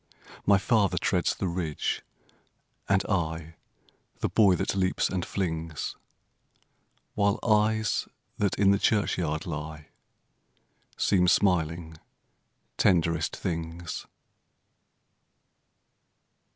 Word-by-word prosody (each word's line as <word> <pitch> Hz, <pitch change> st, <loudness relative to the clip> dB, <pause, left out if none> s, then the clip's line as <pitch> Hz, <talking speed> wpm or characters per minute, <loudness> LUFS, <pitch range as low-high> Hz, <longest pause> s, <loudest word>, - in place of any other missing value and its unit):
My 100 Hz, -1 st, +6 dB
father 100 Hz, 0 st, +2 dB
treads -, -, +1 dB
the 95 Hz, -, -2 dB
ridge, 85 Hz, -3 st, -2 dB, 0.9 s
and 95 Hz, 0 st, +3 dB
I 80 Hz, -4 st, -2 dB, 0.6 s
The -, -, -1 dB
boy 100 Hz, -4 st, +5 dB
that -, -, -1 dB
leaps 95 Hz, -1 st, +1 dB
and 90 Hz, -2 st, -1 dB
flings, 80 Hz, -5 st, -3 dB, 1.2 s
While 100 Hz, -1 st, +2 dB
eyes 110 Hz, -1 st, +2 dB, 0.3 s
that 100 Hz, -2 st, +1 dB
in 100 Hz, 0 st, +5 dB
the 100 Hz, -, +3 dB
churchyard 85 Hz, -8 st, 0 dB
lie 75 Hz, 0 st, -6 dB, 1.1 s
Seem 90 Hz, -3 st, +3 dB
smiling 85 Hz, -4 st, +1 dB, 0.8 s
tenderest 85 Hz, -3 st, +2 dB
things. 85 Hz, -2 st, -4 dB
90 Hz, 85 wpm, -27 LUFS, 80-100 Hz, 1.2 s, My